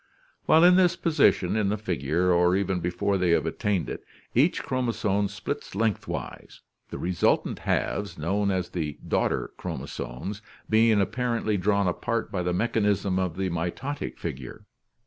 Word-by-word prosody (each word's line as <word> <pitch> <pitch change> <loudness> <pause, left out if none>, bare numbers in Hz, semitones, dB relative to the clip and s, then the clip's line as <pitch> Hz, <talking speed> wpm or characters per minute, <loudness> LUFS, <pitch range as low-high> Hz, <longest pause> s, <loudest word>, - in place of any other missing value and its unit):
While 160 +1 +6
in 180 +1 +7
this 180 -2 +4
position 105 - +2
in 105 -2 +1
the 105 - 0
figure, 90 -2 0
or 90 +1 +4
even 95 -2 0
before 90 +3 -1
they 90 -1 +2
have 85 - +3
attained 100 -4 -1
it, - - -6 0.3
each - - +2
chromosome 110 -5 0
splits 100 -1 -6
lengthwise, 110 -1 -3 0.3
the - - -6
resultant 90 0 +1
halves, 100 -4 -1
known 100 +6 0
as 95 -2 -1
the 75 -5 -4
daughter - - 0
chromosomes, 80 - -6 0.3
being 110 -1 +4
apparently 110 +2 0
drawn 100 0 +1
apart 115 +6 -2
by 95 -4 -1
the 90 0 -1
mechanism 100 -1 +1
of 90 -3 -2
the 95 -1 -1
mitotic 90 - -4
figure. 65 -6 -7
100 Hz, 145 wpm, -26 LUFS, 90-110 Hz, 0.3 s, in